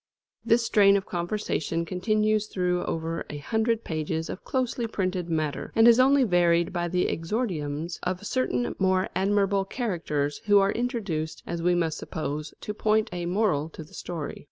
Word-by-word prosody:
This 230 +1 +3
strain 200 -2 +5
of 195 - -4
conversation 170 -2 -2
continues 215 +3 +1
through 180 -3 0
over 165 +1 -3
a 150 - -5
hundred 220 +8 0
pages 160 0 -3
of - - -8
closely 250 -2 -1
printed 185 -4 -2
matter, 155 -3 -2
and 225 +1 +6
is 235 +1 +7
only 270 +1 +5
varied 175 -4 +3
by 175 -1 -1
the 180 +1 +1
exordiums 165 - -2
of 180 +2 -3
certain 125 - 0
more 185 0 +2
admirable 200 0 +2
characters, 165 - -2
who 205 -1 +6
are 195 0 +4
introduced, 210 - -3
as 170 -1 -4
we 175 +1 +3
must 165 -2 0
suppose, 150 -2 -4
to 210 - -4
point 215 0 +1
a 175 -1 -3
moral 175 -6 +1
to 160 - -9
the 150 - -19
story. 165 -4 -5
180 Hz, 165 wpm, -26 LUFS, 165-215 Hz, -, is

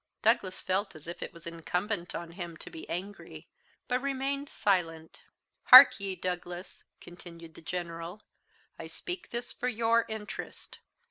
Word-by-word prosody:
Douglas 215 -5 +2
felt 190 0 -1
as 155 - -12
if 170 - -7
it - - -5
was 170 -1 -15
incumbent 175 +3 -3
on 170 -1 -6
him 170 -2 -7
to - - -9
be 160 - -9
angry, 195 +4 -7 0.4
but 250 0 0
remained 275 +1 -2
silent. 165 -5 -1 0.4
"Hark - - +11
ye, 195 -1 -3
Douglas," 180 0 -5 0.2
continued 170 -2 -12
the - - -13
General, 170 +3 -6 0.6
"I - - -6
speak 360 0 -6
this 240 +1 -5
for 250 - -3
your 230 -1 +2
interest. 220 -1 -7
185 Hz, 145 wpm, -30 LUFS, 170-225 Hz, 0.6 s, Hark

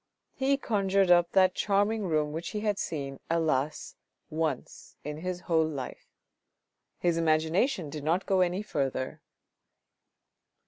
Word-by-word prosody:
He 275 +1 +1
conjured 195 -6 +2
up 175 -1 +5
that 185 -1 +5
charming 205 +2 +1
room 155 -2 +1
which 165 +3 -4
he - - -2
had 210 -2 0
seen, 140 -4 -4
alas! 155 -3 0 0.4
once 155 -4 -3
in 150 +1 -5
his 180 +2 -4
whole 160 -3 +2
life. 140 -5 -6 0.9
His 170 -1 +1
imagination 160 - +1
did 150 -1 -6
not 170 +5 +1
go 190 -1 +2
any 180 +3 +1
further. 135 -7 -2
170 Hz, 130 wpm, -29 LUFS, 155-195 Hz, 0.9 s, up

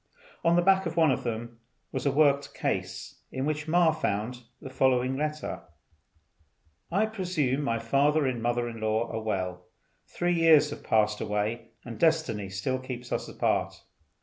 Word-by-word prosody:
On 170 0 +4
the 175 - +3
back 190 0 +4
of 165 0 -6
one 160 -4 +5
of 130 - -1
them 120 0 -5 0.3
was 130 +1 -2
a - - +3
worked 140 -1 +2
case, - - -3
in 130 +1 -2
which 150 0 -2
Ma 170 0 +4
found 125 -5 -2 0.2
the 135 - -9
following 130 0 +2
letter: 150 +2 -3 1.3
"I 200 +5 +3
presume 180 - -1
my 115 -5 0
father 140 +6 +2
and 125 -3 -1
mother 120 +1 0
in 115 -1 -7
law 110 +2 0
are 110 - -3
well. 90 -4 -3 0.4
Three 175 0 -1
years 160 -3 +5
have - - -8
passed 105 -1 +2
away 105 +2 -2 0.2
and 115 -2 -8
destiny 160 - +1
still 100 +8 -2
keeps 125 -1 -7
us - - -2
apart. - - -1
130 Hz, 165 wpm, -28 LUFS, 115-155 Hz, 1.3 s, one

